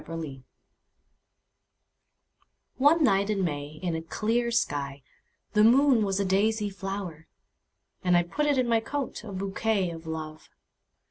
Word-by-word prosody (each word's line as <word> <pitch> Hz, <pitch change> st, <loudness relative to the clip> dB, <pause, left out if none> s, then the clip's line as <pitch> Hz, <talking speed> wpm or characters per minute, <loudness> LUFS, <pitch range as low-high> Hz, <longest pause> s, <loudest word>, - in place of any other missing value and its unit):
My -, -, -16 dB
Flower 165 Hz, -4 st, -6 dB, 2.4 s
ONE 300 Hz, +4 st, +5 dB
night 200 Hz, -4 st, +3 dB
in 200 Hz, -3 st, 0 dB
May 145 Hz, -2 st, -4 dB
in 175 Hz, -2 st, -1 dB
a 160 Hz, -, -3 dB
clear 225 Hz, +8 st, -1 dB
skyThe 140 Hz, -11 st, -1 dB, 0.6 s
moon 250 Hz, 0 st, +5 dB
was 195 Hz, -1 st, 0 dB
a 200 Hz, -, +1 dB
daisy 205 Hz, +2 st, +1 dB
flower:And! 180 Hz, -1 st, -4 dB
put 300 Hz, 0 st, 0 dB
it 290 Hz, -2 st, +2 dB
in 255 Hz, -1 st, +2 dB
my 230 Hz, -1 st, +3 dB
coat,A 230 Hz, -3 st, -5 dB
bouquet 195 Hz, 0 st, -1 dB
of 165 Hz, 0 st, -9 dB
Love! 155 Hz, -1 st, -6 dB
195 Hz, 125 wpm, -27 LUFS, 165-225 Hz, 2.4 s, ONE